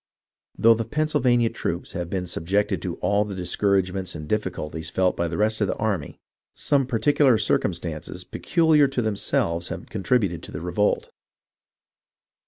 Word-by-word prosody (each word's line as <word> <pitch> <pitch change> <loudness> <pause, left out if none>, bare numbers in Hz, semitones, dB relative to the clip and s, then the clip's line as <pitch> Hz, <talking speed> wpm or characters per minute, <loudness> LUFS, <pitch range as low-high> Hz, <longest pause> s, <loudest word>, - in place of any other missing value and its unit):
Though 115 +1 +6
the 115 0 -2
Pennsylvania 125 -3 +1
troops - - -4
have 85 -1 -4
been 90 -1 -2
subjected 90 +4 0
to - - -3
all 100 0 +2
the 105 -2 -6
discouragements 95 0 0
and 75 -1 -7
difficulties 80 -5 -3
felt 95 -1 +1
by 85 - -1
the 80 - -4
rest 110 +1 +1
of 105 - +2
the - - -1
army, 100 -10 -2 0.4
some 140 -3 +1
particular 135 0 +3
circumstances 85 -6 -2
peculiar 160 -4 +3
to 135 -2 -2
themselves 85 -5 -1
have - - -7
contributed 95 -4 0
to - - -11
produce - - -4
the 85 - -7
revolt. 95 +4 0
100 Hz, 155 wpm, -24 LUFS, 90-115 Hz, 0.4 s, Though